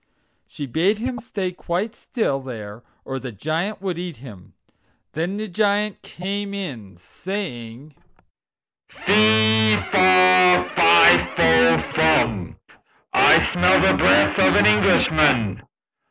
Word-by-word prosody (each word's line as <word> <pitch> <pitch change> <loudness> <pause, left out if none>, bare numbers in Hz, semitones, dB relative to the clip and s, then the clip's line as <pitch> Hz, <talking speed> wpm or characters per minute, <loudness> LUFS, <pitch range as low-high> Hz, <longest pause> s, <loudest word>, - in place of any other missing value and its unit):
She 145 - -9
bade 170 - -1
him 245 +2 -6
stay 200 -5 -6
quite 180 +5 -5
still 220 - -4
there, 110 -5 -10 0.2
or 135 0 -6
the 130 -1 -9
Giant 165 - -5
would 180 -3 -5
eat 175 -3 -7
him. 110 -8 -15 0.6
Then 175 +6 -5
the 215 +1 -6
Giant 205 +1 -2
came 200 +2 -7
in, 115 - -9
saying: 135 - -9 1.0
"Fe, 110 0 +2 0.2
fa, 185 -1 +4
fi 85 0 +5
fo 80 0 +3
furn, 120 - 0 0.6
I - - +3
smell - - +2
the - - +2
breath 100 0 +2
of 95 0 +3
an 105 - +3
Englishman. 115 +1 +1
155 Hz, 115 wpm, -20 LUFS, -, 1.0 s, fi